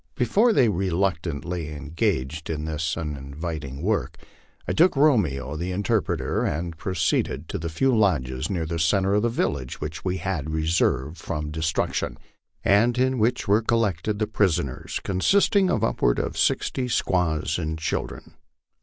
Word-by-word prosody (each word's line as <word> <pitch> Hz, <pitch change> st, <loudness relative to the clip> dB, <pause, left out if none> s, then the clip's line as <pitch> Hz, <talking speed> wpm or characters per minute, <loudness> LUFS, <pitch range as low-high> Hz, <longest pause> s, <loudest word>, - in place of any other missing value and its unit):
Before 200 Hz, -, +3 dB
they 135 Hz, -, +4 dB
reluctantly 90 Hz, -4 st, -1 dB
engaged 80 Hz, -, -2 dB
in 75 Hz, -1 st, -3 dB
this 80 Hz, +1 st, -2 dB
uninviting 75 Hz, -1 st, -5 dB
work, 80 Hz, -, -1 dB, 0.5 s
I -, -, 0 dB
took 175 Hz, +1 st, +4 dB
Romeo, 85 Hz, -, +2 dB
the 85 Hz, +4 st, -3 dB
interpreter, 100 Hz, +3 st, 0 dB
and 85 Hz, +3 st, -2 dB
proceeded 80 Hz, -4 st, -1 dB
to -, -, -3 dB
the 85 Hz, +1 st, -3 dB
few 125 Hz, +11 st, +2 dB
lodges 75 Hz, -, +1 dB
near 85 Hz, -4 st, -1 dB
the 85 Hz, +1 st, -3 dB
centre 95 Hz, +5 st, +2 dB
of 105 Hz, -, +3 dB
the 120 Hz, -, +1 dB
village 70 Hz, -, -2 dB
which 75 Hz, +1 st, -5 dB
we 95 Hz, 0 st, -1 dB
had 85 Hz, -5 st, -3 dB
reserved 80 Hz, -2 st, 0 dB
from 75 Hz, -2 st, -4 dB
destruc 80 Hz, +1 st, -1 dB
tion, -, -, -2 dB, 0.5 s
and 115 Hz, +5 st, +4 dB
in 130 Hz, 0 st, +2 dB
which 120 Hz, +3 st, +1 dB
were 105 Hz, +3 st, +4 dB
collected 105 Hz, -4 st, 0 dB
the 105 Hz, -, +1 dB
prisoners, 95 Hz, -, -1 dB
consisting 195 Hz, -, +3 dB
of -, -, +1 dB
upward -, -, +2 dB
of -, -, -2 dB
sixty 130 Hz, -1 st, +1 dB
squaws 85 Hz, -8 st, 0 dB
and 80 Hz, -1 st, -3 dB
children. 80 Hz, -, -4 dB
85 Hz, 150 wpm, -25 LUFS, 75-105 Hz, 0.5 s, they